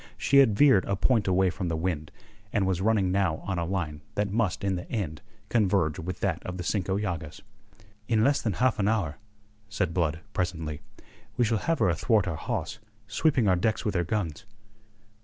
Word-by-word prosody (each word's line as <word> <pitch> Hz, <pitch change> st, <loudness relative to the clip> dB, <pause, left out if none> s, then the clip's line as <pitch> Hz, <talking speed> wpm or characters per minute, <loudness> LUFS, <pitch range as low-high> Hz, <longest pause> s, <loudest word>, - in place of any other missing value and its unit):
She 140 Hz, -, +3 dB
had 115 Hz, -7 st, +6 dB
veered 135 Hz, -10 st, +5 dB
a 100 Hz, -, 0 dB
point 110 Hz, +2 st, +2 dB
away 95 Hz, 0 st, +3 dB
from 90 Hz, 0 st, -4 dB
the 80 Hz, -1 st, -1 dB
wind, 80 Hz, -3 st, -2 dB, 0.4 s
and 100 Hz, -3 st, +1 dB
was 95 Hz, -1 st, 0 dB
running 100 Hz, -3 st, +2 dB
now 95 Hz, -4 st, +1 dB
on 95 Hz, -3 st, -2 dB
a 85 Hz, -, -1 dB
line 85 Hz, -5 st, -3 dB
that 105 Hz, -1 st, 0 dB
must 105 Hz, -4 st, 0 dB
in 95 Hz, -1 st, +1 dB
the 90 Hz, -, -7 dB
end 85 Hz, -9 st, -3 dB, 0.3 s
converge 95 Hz, -8 st, +1 dB
with 90 Hz, +2 st, -5 dB
that -, -, 0 dB
of 90 Hz, 0 st, -5 dB
the 90 Hz, -, -4 dB
Cinco 95 Hz, +1 st, -1 dB
Llagas. 85 Hz, -7 st, -4 dB, 0.7 s
"In 110 Hz, -2 st, +2 dB
less 140 Hz, +2 st, +3 dB
than 110 Hz, -, -1 dB
half 125 Hz, +2 st, +1 dB
an 100 Hz, -, +2 dB
hour," 100 Hz, -9 st, 0 dB, 0.5 s
said 95 Hz, -6 st, -1 dB
Blood 80 Hz, -2 st, 0 dB
presently, 80 Hz, -5 st, -3 dB, 0.6 s
"we 120 Hz, -, +3 dB
shall 110 Hz, -1 st, +1 dB
have 165 Hz, +7 st, 0 dB
her 95 Hz, -, +3 dB
athwart 95 Hz, +4 st, +2 dB
our 85 Hz, -, -2 dB
hawse, 105 Hz, +7 st, -4 dB, 0.3 s
sweeping 130 Hz, 0 st, +1 dB
our 95 Hz, -, +4 dB
decks 110 Hz, +5 st, 0 dB
with 105 Hz, -, 0 dB
her 85 Hz, -, +1 dB
guns." 90 Hz, -1 st, -3 dB
95 Hz, 195 wpm, -27 LUFS, 85-110 Hz, 0.7 s, had